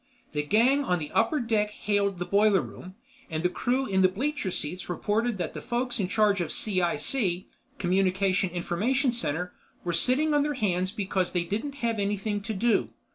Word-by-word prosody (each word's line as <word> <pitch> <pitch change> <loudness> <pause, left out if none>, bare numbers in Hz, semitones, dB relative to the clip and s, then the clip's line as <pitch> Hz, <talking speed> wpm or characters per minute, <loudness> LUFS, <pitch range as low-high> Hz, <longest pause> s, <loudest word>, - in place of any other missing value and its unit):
The 150 - -1
gang 235 - +3
on 180 -8 +1
the 150 -3 -6
upper 230 +7 +2
deck 220 -4 +1
hailed 205 -2 0
the 180 - -3
boiler 205 0 +4
room, 185 +1 -10 0.3
and 160 -1 -3
the 180 - +3
crew 255 +8 0
in 190 -5 +1
the 185 - +6
bleacher 265 +3 -2
seats 175 +1 -3
reported 210 +6 0
that 175 -3 -3
the - - -6
folks 245 0 -1
in 190 - 0
charge 205 -1 +2
of 170 - -3
C.I.C.—Communication 185 -1 0
Information 220 - 0
Center—were 180 -4 -4
sitting 260 - +3
on 295 - +4
their 295 0 -1
hands 185 -6 0
because 195 -3 -1
they 175 -1 +1
didn't 225 +11 -3
have 230 -2 0
anything 205 +1 -1
to 220 +2 -4
do. 230 +4 +2
200 Hz, 175 wpm, -27 LUFS, 180-235 Hz, 0.3 s, the